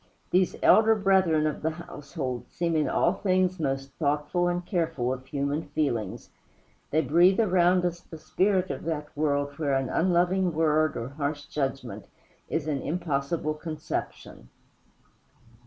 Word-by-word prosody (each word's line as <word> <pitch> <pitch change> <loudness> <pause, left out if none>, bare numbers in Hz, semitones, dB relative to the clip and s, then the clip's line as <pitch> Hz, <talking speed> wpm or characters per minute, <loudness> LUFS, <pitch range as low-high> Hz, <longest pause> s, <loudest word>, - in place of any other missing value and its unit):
These 185 0 +2
elder 220 0 +6
brethren 190 -6 +3
of 155 - -2
the 160 - +1
household 140 -6 -6
seem 170 -1 -1
in 150 -4 +1
all 175 - +2
things 185 -2 +1
most 135 -2 -2
thoughtful 150 +4 0
and 175 0 -1
careful 160 - -1
of 130 0 -9
human 140 +2 -2
feelings; 145 -7 -2 0.6
they 155 - +2
breathe 175 - +4
around 180 -3 +3
us 175 -1 -2
the 160 - -11
spirit 185 +4 +1
of 135 - -6
that 150 -2 -4
world 145 -1 -1
where 140 -3 +1
an 135 -1 -1
unloving 180 +1 +2
word 155 -1 +2
or 115 +2 -4
harsh 145 +1 -3
judgment 135 -4 -4 0.4
is 160 -1 -2
an 140 -3 -1
impossible 155 -1 -2
conception. 155 0 -6
155 Hz, 140 wpm, -27 LUFS, 145-175 Hz, 0.6 s, elder